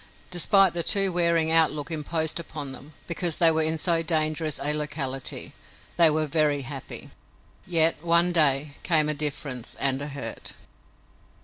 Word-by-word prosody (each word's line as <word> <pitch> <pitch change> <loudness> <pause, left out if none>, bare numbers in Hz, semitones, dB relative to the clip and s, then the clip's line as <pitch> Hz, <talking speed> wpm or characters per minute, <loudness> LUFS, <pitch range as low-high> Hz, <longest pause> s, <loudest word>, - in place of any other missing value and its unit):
Despite 185 +1 +3
the 170 - -1
too 195 +1 +2
wearing 170 -2 +1
outlook 160 -1 +1
imposed 160 +1 -2
upon 150 -4 -7
them, 140 +3 -12
because 170 -1 -2
they 165 -2 +5
were 160 0 0
in 160 +1 +1
so 165 +1 +1
dangerous 155 -1 -1
a 145 +2 +1
locality, 145 -3 -3 0.4
they 170 -2 +6
were 155 0 -1
very 150 -2 0
happy. 135 0 -7 0.6
Yet, 165 -2 +2
one 170 +1 +4
day, 150 -3 +4
came 155 -3 +2
a - - +1
difference 145 -4 -5
and 135 0 +1
a 145 - -3
hurt. 140 -2 -5
155 Hz, 150 wpm, -24 LUFS, 145-170 Hz, 0.6 s, they